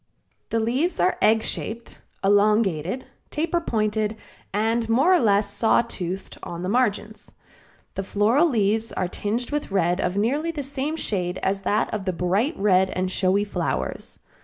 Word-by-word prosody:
The 230 - 0
leaves 255 +11 0
are 365 - +2
egg 220 +1 +4
shaped, 230 +2 -5 0.2
elongated, 205 - +2 0.2
taper 335 +3 -1
pointed 215 -5 -1 0.4
and 225 +3 0
more 275 +11 +4
or 365 - +5
less 205 -3 +2
saw 225 +2 +4
toothed 190 -4 -6
on 170 0 -6
the 185 - -2
margins. 215 -2 -1 0.6
The - - -3
floral 220 - +2
leaves 220 -2 +1
are 185 - -2
tinged 220 +8 -3
with 295 0 -2
red 180 -1 +1
of 180 +2 -1
nearly 280 +10 0
the 310 -4 -3
same 280 +3 -3
shade 185 - -2
as 195 +1 0
that 205 +3 0
of 205 -3 -3
the 185 - 0
bright 195 - 0
red 190 -2 +3
and 185 0 -2
showy 190 +2 +2
flowers. 170 - -3
210 Hz, 160 wpm, -24 LUFS, 190-240 Hz, 0.6 s, or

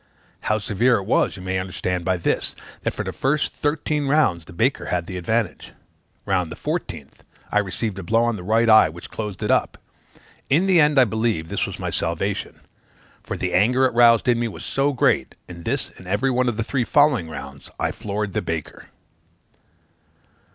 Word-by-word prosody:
How 105 - +1
severe 115 +4 +2
it 100 - -4
was, 105 - +1
you 90 - -9
may 95 0 -1
understand 90 -1 -3
by 95 -1 +1
this, 85 - -1 0.3
that - - -2
for - - -3
the - - -4
first 145 +3 0
thirteen 150 -1 -1
rounds 110 - +2
the - - -13
baker 115 +10 0
had 85 -1 -1
the 95 - -7
advantage. 110 +6 -2 0.5
Round 90 -4 0
the - - -6
fourteenth, - - -5 0.3
I 105 - +3
received 100 +1 -3
a - - -6
blow 115 +6 +2
on 120 -1 +1
the 100 - -7
right 110 +4 +2
eye, 110 -7 +7
which 85 +2 -10
closed 105 -3 -5
it - - +1
up; - - +1 0.7
in 160 +8 +3
the 185 -3 +4
end, 150 -1 +4
I 130 - +7
believe, 110 -7 -1
this - - -1
was - - -7
my - - -4
salvation: - - -2 0.6
for - - -5
the - - -2
anger 125 +7 +4
it 130 - +1
roused 115 -1 +5
in 120 -1 +3
me 120 - 0
was 110 - -7
so 140 +1 +1
great 130 - +1
that, 90 - -10
in 85 - -11
this 135 +2 -1
and 90 - -12
every 105 +8 +1
one 125 0 +2
of 115 - -4
the 115 - 0
three 130 +2 -1
following 130 - +3
rounds, 70 -3 -9
I - - 0
floored 105 -2 -4
the - - 0
baker. 80 -2 -5
110 Hz, 200 wpm, -22 LUFS, 95-125 Hz, 0.7 s, eye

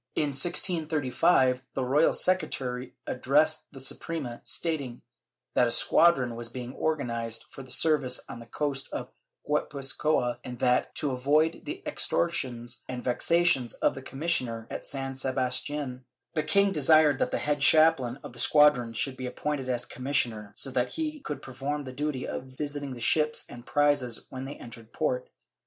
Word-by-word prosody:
^ - - +3
In 150 - +1
1635, 155 -4 +2
the 130 - -1
royal 145 +5 +4
secretary 130 -9 -1
addressed 150 +5 +1
the 135 - -11
Suprema, 135 -1 -3
stating 135 -3 -3 0.5
that - - +4
a - - 0
squadron 135 -8 +4
was 115 0 -6
being 125 0 -7
organized 115 -7 -2
for 135 - -9
service 140 -5 +2
on 120 - -8
the 115 - -12
coast 140 +2 -2
of - - -5 0.4
Guipuzcoa 140 -3 0
and 125 -1 -7
that, 125 0 +1
to 145 -3 0
avoid 145 +6 +1
the 365 +6 -6
extortions 120 -8 -1
and 125 -1 -5
vexations 135 -1 +2
of - - +1
the 135 - -8
commissioner 130 -6 0
at - - -6
San 135 -1 -4
Sebastian, 130 0 -2 0.3
the 155 - +1
king 200 +6 +3
desired 155 -3 +4
that - - +1
the - - -1
head 145 0 -1
chaplain 140 -5 +5
of - - -9
the 120 - -6
squadron 135 -4 +5
should 130 +3 -1
be 130 -1 -5
appointed 135 0 -3
as 120 -1 -1
commissioner, 120 -6 -1
so 135 - -3
that 125 0 -1
he 310 -1 -3
could 150 - -6
perform 135 +3 -4
the 130 -2 -8
duty 145 -1 -3
of - - -5
visiting 145 +1 -5
the 120 - -9
ships 155 +5 +2
and 120 0 -12
prizes 145 -5 +1
when 130 0 -6
they 140 - -6
entered 115 -1 -12
port. - - -1
135 Hz, 160 wpm, -28 LUFS, 125-150 Hz, 0.5 s, chaplain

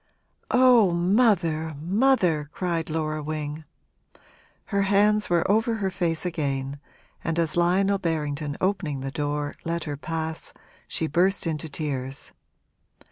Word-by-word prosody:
'Oh, 250 -5 +6
mother, 170 -5 +2
mother!' 180 - +2
cried 170 -3 -2
Laura 155 -1 -2
Wing. 150 0 -4 1.0
Her 200 -1 0
hands 205 +2 +3
were 175 -1 +2
over 225 +3 +2
her 195 -3 -1
face 170 -3 -1
again 140 -5 -2 0.4
and 165 0 -1
as 165 -2 +1
Lionel 190 +3 +2
Berrington, 150 -4 -2
opening 180 -8 -1
the 135 0 -4
door, 145 0 -2
let 170 0 -2
her 145 -2 -4
pass, 160 +1 -3 0.3
she 160 - -1
burst 180 +6 +2
into 160 -1 -2
tears. 135 -3 -3
165 Hz, 125 wpm, -25 LUFS, 150-195 Hz, 1.0 s, Oh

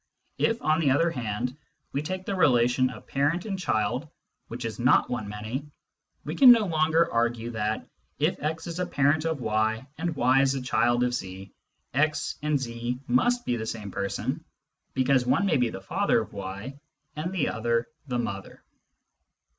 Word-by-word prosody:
If, 230 +2 +1
on 155 +1 +3
the 155 -4 +3
other 165 +5 +3
hand, 125 -1 -3 0.4
we 140 - -1
take 185 +4 -4
the - - -2
relation 125 -6 +3
of 125 - -10
parent 150 +7 0
and 195 -3 -3
child, 125 - -1 0.4
which 120 +1 -6
is 115 +1 -5
not 125 +2 +4
one 115 -4 -2
many, 110 +7 -5 0.6
we - - -3
can 260 -3 +9
no 230 -3 +5
longer 160 0 +2
argue 120 0 0
that, 110 -1 -2 0.3
if - - +1
x 160 +2 -2
is 170 0 -5
a 180 - -1
parent 145 0 +2
of 160 -4 -1
y 110 +1 0
and 165 -1 -2
y 130 +1 +4
is 135 0 +2
a 135 - -2
child 120 -1 +2
of 125 0 0
z, 95 -4 -6 0.4
x 150 +3 0
and 150 -1 +1
z 120 0 -4
must 245 - +2
be 120 - 0
the 110 -1 -4
same 105 -3 -5
person, 100 0 -3 0.5
because 130 0 +3
one 200 - +3
may 170 -7 +3
be 125 -2 +2
the 95 - -7
father 185 - +1
of 110 - -9
y 100 +8 -6 0.4
and 155 +4 -3
the 185 -6 0
other 115 +1 0 0.2
the 125 -2 -1
mother. 100 -5 -5
130 Hz, 180 wpm, -27 LUFS, 115-155 Hz, 0.6 s, can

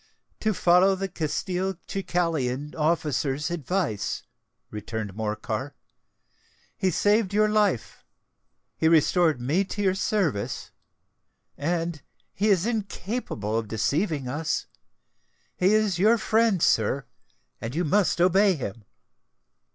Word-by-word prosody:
"To 215 - +1
follow 180 +3 +4
the 195 +1 -3
Castelcicalan 170 -5 -2
officer's 150 -1 0
advice," 160 - -2 0.5
returned 105 -1 -5
Morcar. 110 +1 -3 1.0
"He 190 - +1
saved 205 +2 +2
your 215 0 +4
life—he 205 - -3
restored 160 -2 +3
me 145 +11 +1
to 205 +2 -4
your 190 -1 +3
service—and 170 - -4 0.3
he 205 +3 0
is 190 -2 +3
incapable 205 - -3
of 115 -1 -1
deceiving 140 - -1
us. 150 +5 -2 0.9
He 185 +2 +3
is 210 -5 +1
your 220 +5 +5
friend, 220 -4 +2
sir—and 115 - -2
you 175 - +1
must 190 +3 +2
obey 190 +2 +4
him." 110 -6 -6
170 Hz, 95 wpm, -26 LUFS, 135-195 Hz, 1.0 s, your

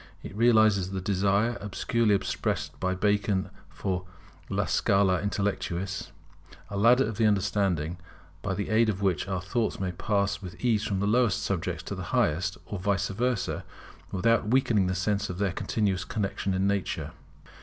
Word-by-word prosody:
It - - -8
realizes 110 -4 +4
the 95 0 -3
desire 100 +4 +1
obscurely 105 +2 +1
expressed 95 - -2
by 95 0 0
Bacon 100 -1 +1 0.2
for 90 -2 -3 0.4
a - - 0
scala 95 -3 +2
intellectûs, 100 -3 -2 0.6
a - - -4
ladder 120 +6 +5
of 110 -2 -5
the 110 - +4
understanding, 95 -5 0 0.4
by 95 -2 -2
the 100 0 -3
aid 110 +1 +4
of 100 -1 -2
which 95 0 +1
our 95 -2 -2
thoughts 115 +3 -1
may 95 -2 -1
pass 100 +1 -1
with 90 -3 -9
ease 110 -4 +2
from 100 -2 -1
the - - +1
lowest 115 -1 +2
subjects 90 -2 -2
to 100 - -5
the 95 -2 -5
highest, 90 -4 +1
or 100 - -5
vice 100 +1 0
versa, 120 +2 -1 0.5
without 115 +3 +2
weakening 115 -5 +3
the 95 - -1
sense 100 +3 0
of 90 - -4
their 100 -2 0
continuous 95 -3 0
connexion 100 -1 -2
in 95 +1 +1
nature. 100 -1 -1
100 Hz, 165 wpm, -28 LUFS, 95-105 Hz, 0.6 s, ladder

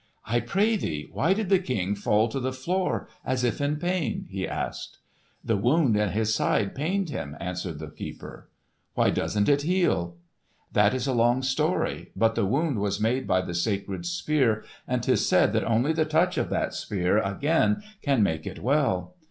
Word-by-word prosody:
"I 120 +2 +1
pray 200 - +1
thee, 75 - -4
why 170 +7 +2
did 210 -3 -2
the 195 -2 +5
King 105 - -1
fall 105 +2 +2
to 135 - -3
the 130 0 -1
floor 180 +9 -1 0.2
as 130 -1 -1
if 120 +2 0
in 145 +1 +1
pain?" 175 -5 -2
he 95 0 -3
asked. - - -5 0.5
"The 115 - +1
wound 125 +3 +3
in 105 -1 +2
his 110 +2 0
side 105 -2 +1
pained 175 +4 -1
him," 75 - -5
answered 90 -2 -4
the 75 -1 -8
keeper. - - -9 0.5
"Why - - +3
doesn't 105 -1 0
it 145 0 +4
heal?" 155 - +1 0.6
"That 105 +3 +4
is 130 0 -2
a 135 - 0
long 120 +2 +3
story. 150 +7 0
But 115 0 +3
the 100 - 0
wound 140 - 0
was 100 0 -1
made 120 +5 0
by 95 0 +3
the 90 -1 -5
sacred 100 - -2
Spear, 145 -10 +1 0.2
and - - -1
'tis - - +2
said - - +4
that - - +1
only 120 +7 +2
the 160 0 +1
touch 165 +4 +2
of - - -1
that - - -1
Spear 95 +1 0
again 160 - +1 0.2
can 135 -6 +2
make 80 -5 -1
it - - -6
well." 135 - +1
125 Hz, 185 wpm, -26 LUFS, 100-155 Hz, 0.6 s, the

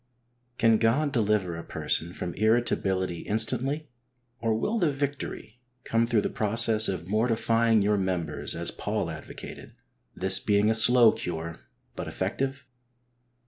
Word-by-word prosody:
Can 115 -1 +3
God 140 +6 +1
deliver 105 - 0
a 85 - -7
person 85 +1 -1
from 90 -1 -5
irritability 95 -5 0
instantly, 125 - 0 0.5
or 115 -1 0
will 215 - -1
the 170 -6 +2
victory 135 -5 -5 0.2
come 115 0 +1
through 115 -3 +2
the - - -2
process 110 0 +2
of 90 -4 -3
mortifying 115 +1 +2
your 105 0 +2
members, 90 -5 -1
as - - -2
Paul - - -3
advocated, - - -10 0.4
this 95 0 +4
being 105 +1 +2
a - - +3
slow 115 +1 +6
cure, 85 -1 -6 0.4
but - - -6
effective 135 +1 -3
110 Hz, 135 wpm, -27 LUFS, 95-120 Hz, 0.5 s, slow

